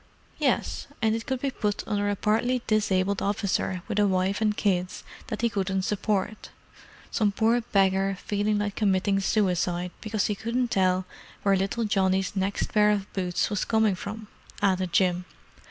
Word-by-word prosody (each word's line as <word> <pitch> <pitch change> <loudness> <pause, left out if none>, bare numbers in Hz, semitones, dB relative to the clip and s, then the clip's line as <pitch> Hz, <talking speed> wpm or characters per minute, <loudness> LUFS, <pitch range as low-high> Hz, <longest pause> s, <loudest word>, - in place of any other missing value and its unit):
"Yes, - - 0
and 220 -2 +2
it 225 +3 -4
could 260 -2 -2
be 275 - 0
put 210 -4 -2
under 205 -1 0
a 205 - 0
partly 235 +5 +1
disabled 200 -2 +1
officer 195 -3 -1
with 210 -2 -1
a 205 - +4
wife 190 +2 0
and 210 -1 +1
kids 185 -3 0 0.2
that 215 - -4
he - - +5
couldn't 190 -2 -1
support—some 210 +1 -3
poor 230 +3 +2
beggar 195 -3 +2
feeling 210 +1 0
like 205 -1 -2
committing 195 -1 +2
suicide 180 -3 0
because 215 -2 -1
he 210 - 0
couldn't 235 +4 -2
tell 185 -1 +2 0.4
where 200 -1 +4
little 195 +5 -1
Johnny's 190 -2 +1
next 195 +1 -1
pair 210 -1 +5
of 205 -2 -1
boots 180 0 -1
was 205 - 0
coming 220 -2 +2
from!" 210 +4 -7 0.3
added 185 -3 +1
Jim. 180 0 +2
200 Hz, 160 wpm, -26 LUFS, 190-215 Hz, 0.4 s, he